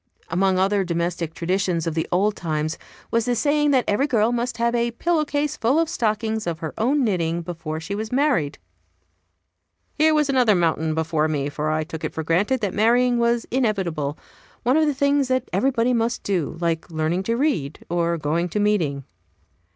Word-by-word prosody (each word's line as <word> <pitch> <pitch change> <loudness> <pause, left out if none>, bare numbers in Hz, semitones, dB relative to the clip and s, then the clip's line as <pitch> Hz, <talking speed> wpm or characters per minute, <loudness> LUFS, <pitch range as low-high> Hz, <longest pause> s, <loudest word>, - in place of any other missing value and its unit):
Among 185 +2 +2
other 195 +1 +2
domestic 170 -2 -2
traditions 180 -1 -1
of 165 - -1
the 160 0 -1
old 200 +4 +2
times 155 -1 -2 0.3
was 230 -1 +1
the 245 - +1
saying 295 +3 +2
that 260 -4 +3
every 270 +8 +2
girl 230 -4 +2
must 240 -1 -2
have 235 0 +1
a 235 0 +1
pillow 310 +6 0
case 290 0 -1
full 250 +5 +1
of 330 - +2
stockings 220 - -1
of 165 -2 -2
her 160 -1 -5
own 270 +6 +1
knitting 170 -6 0
before 165 -2 -5
she 165 +5 -5
was 220 +2 -4
married. 250 - +1 1.4
Here 310 0 +3
was 300 -1 +2
another 250 -6 +3
mountain 160 -2 +1
before 160 -1 0
me, 145 -2 -1
for 150 +1 -3
I 155 0 0
took 160 0 -8
it - - -4
for 160 - -2
granted 200 +11 +1
that 200 -3 -1
marrying 240 +3 +3
was 235 0 +1
inevitable 190 - -1 0.5
one 250 +3 +3
of 315 0 +3
the 295 - 0
things 280 0 +2
that 255 0 0
everybody 240 +4 +2
must 235 0 0
do, 175 -5 -1
like 170 -1 -1
learning 160 +2 -1
to 230 - +1
read, 240 - -1
or 170 0 0
going 165 +3 -1
to 210 - -2
meeting. 170 -10 +1
205 Hz, 190 wpm, -23 LUFS, 165-245 Hz, 1.4 s, that